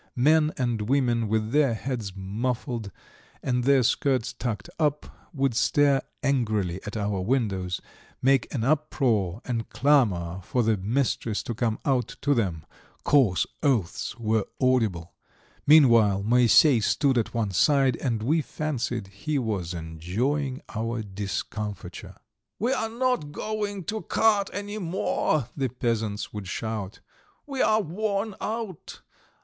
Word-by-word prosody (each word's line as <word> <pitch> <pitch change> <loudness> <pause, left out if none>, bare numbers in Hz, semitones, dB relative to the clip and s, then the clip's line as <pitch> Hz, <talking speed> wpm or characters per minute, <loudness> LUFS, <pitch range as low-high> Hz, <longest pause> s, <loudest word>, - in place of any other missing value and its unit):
Men 155 +4 +4
and 120 -4 -1
women, 120 -4 +2
with 110 +1 0
their 140 -5 +3
heads 115 -5 -4
muffled 115 +3 -3 0.5
and 125 -2 0
their 135 -2 +5
skirts 125 0 +1
tucked 110 -6 -4
up, 150 -2 -2
would 135 -4 0
stare 140 +3 +3 0.2
angrily 110 -10 0
at 105 - -4
our 100 -2 -1
windows, 95 -5 -1 0.4
make 135 +1 +2
an 120 -6 -2
uproar, 120 - +1
and 115 -3 -3
clamour 95 - +2
for 120 +7 0
the 110 0 +3
mistress 110 +1 -1
to 120 - -4
come 115 -1 -1
out 130 -5 0
to 145 - +2
them; 90 - -1 0.4
coarse 125 -11 +3 0.2
oaths 120 - 0
were 110 -2 0
audible. 110 -10 +1 0.5
Meanwhile 115 -10 +6
Moisey 120 +3 +5
stood 135 +5 +2
at 120 0 -1
one 110 -4 0
side, 135 - +3
and 115 -5 -2
we 155 +7 +2
fancied 125 -8 -3
he 100 +10 -3
was 105 -9 -2
enjoying 105 - -2
our 115 +1 -3
discomfiture. 100 -1 -5 0.4
"We 240 +5 +1
are 225 -4 -1
not 235 - -1
going 205 +1 -3
to 215 +6 -3
cart 205 -3 +2
any 205 +1 -5
more," 165 - 0
the 135 -3 -1
peasants 115 -3 -2
would 105 -3 -6
shout. 105 0 -4 0.4
"We 275 -2 -3
are 215 0 +4
worn 200 +4 -2
out! 220 -6 -5
120 Hz, 130 wpm, -26 LUFS, 105-145 Hz, 0.5 s, Meanwhile